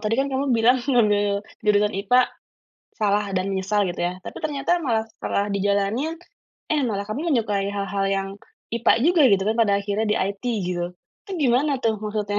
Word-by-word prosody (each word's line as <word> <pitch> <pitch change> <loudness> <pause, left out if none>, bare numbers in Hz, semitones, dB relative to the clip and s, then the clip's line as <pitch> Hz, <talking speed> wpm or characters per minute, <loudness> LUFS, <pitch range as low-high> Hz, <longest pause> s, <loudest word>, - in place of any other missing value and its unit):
Tadi 215 +1 0
kan 270 +1 +1
kamu 270 +1 -1
bilang 245 +1 +4
ngambil 205 -5 +2 0.2
jurusan 210 0 +2
IPA 245 +6 +4 0.7
salah 210 -1 +1
dan 185 0 -1
menyesal 195 +2 0
gitu 175 - -5
ya. 175 - 0
Tapi - - -9
ternyata 300 +3 0
malah 225 -6 0
setelah 205 -2 -2
dijalanin, 200 +8 0 0.6
eh 305 -1 +1
malah 200 -4 -2
kamu 300 +10 -2
menyukai 205 -5 0
hal-hal 200 0 -2
yang 195 0 -2 0.5
IPA 235 - +4
juga 345 -1 +4
gitu 195 -1 +3
kan 220 - 0
pada 225 -3 +3
akhirnya 205 +2 -1
di - - +1
IT 195 +3 -3 0.2
gitu. 175 -1 -2 0.4
Itu 395 - -9
gimana 270 +1 +2
tuh 225 -3 +1
maksudnya? 210 -1 -2
210 Hz, 175 wpm, -23 LUFS, 200-250 Hz, 0.7 s, bilang